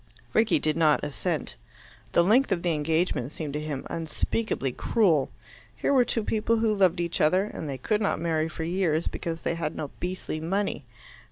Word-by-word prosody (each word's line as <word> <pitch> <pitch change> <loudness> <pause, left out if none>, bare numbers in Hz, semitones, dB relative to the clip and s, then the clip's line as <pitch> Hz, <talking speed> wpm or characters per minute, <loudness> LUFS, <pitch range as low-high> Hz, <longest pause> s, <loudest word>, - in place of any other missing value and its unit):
Rickie 220 -7 +4
did 155 +1 0
not 155 -3 +3
assent. 145 -1 -2 0.6
The 170 - +5
length 225 +7 +4
of 175 -3 0
the 175 -2 +2
engagement 155 -3 0
seemed 155 -3 -5
to 150 - -2
him 150 -3 -4
unspeakably 165 - -2
cruel. 165 - +2 0.5
Here - - 0
were 255 -3 +5
two 225 - -1
people 225 +2 +1
who 220 -1 +2
loved 185 -4 +3
each 170 -1 -1
other, 185 +5 +4
and 165 -7 -6
they 135 - -3
could 210 - 0
not 200 - +1
marry 160 -1 0
for 160 - -5
years 170 -2 0
because 165 -2 -4
they - - 0
had 165 -2 -3
no 145 - -5
beastly 180 -3 -3
money. 180 -2 -2
170 Hz, 185 wpm, -27 LUFS, 155-195 Hz, 0.6 s, The